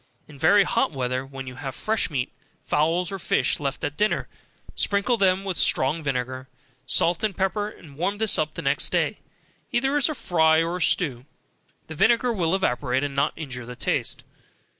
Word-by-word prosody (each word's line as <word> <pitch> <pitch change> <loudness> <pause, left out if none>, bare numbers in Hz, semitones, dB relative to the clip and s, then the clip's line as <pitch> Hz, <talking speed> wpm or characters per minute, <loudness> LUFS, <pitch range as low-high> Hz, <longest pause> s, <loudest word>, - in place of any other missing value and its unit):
In 145 -2 -14
very 200 +7 +5
hot - - +1
weather, 130 -2 -2
when 135 0 -8
you 130 - -7
have 135 -2 -5
fresh 215 -3 -1
meat, 130 -4 -2 0.3
fowls, 165 +4 +1
or 195 - -4
fish - - +1
left 140 -2 -3
at 145 - -3
dinner, 210 +1 +1 0.5
sprinkle 200 +4 +1
them 190 -3 +2
with 190 -3 -3
strong 150 +5 +3
vinegar, 130 -2 -3 0.4
salt 170 +8 +2
and 210 -4 -1
pepper, 205 +2 -1 0.2
warm 190 +7 -1
this 220 -1 +3
up 155 0 -1
the - - -5
next - - +2
day, - - 0 0.5
either 270 +3 +1
as 290 +1 +4
a 310 - -3
fry 160 -5 +3
or 170 +2 -3
stew, 140 -5 +1 0.6
the 160 - -8
vinegar 235 +8 +3
will 180 -3 +1
evaporate, 130 -6 0
and 145 -1 -2
not 140 +2 +1
injure 125 -6 -6
the 125 - -7
taste. - - -1
160 Hz, 180 wpm, -24 LUFS, 135-200 Hz, 0.6 s, very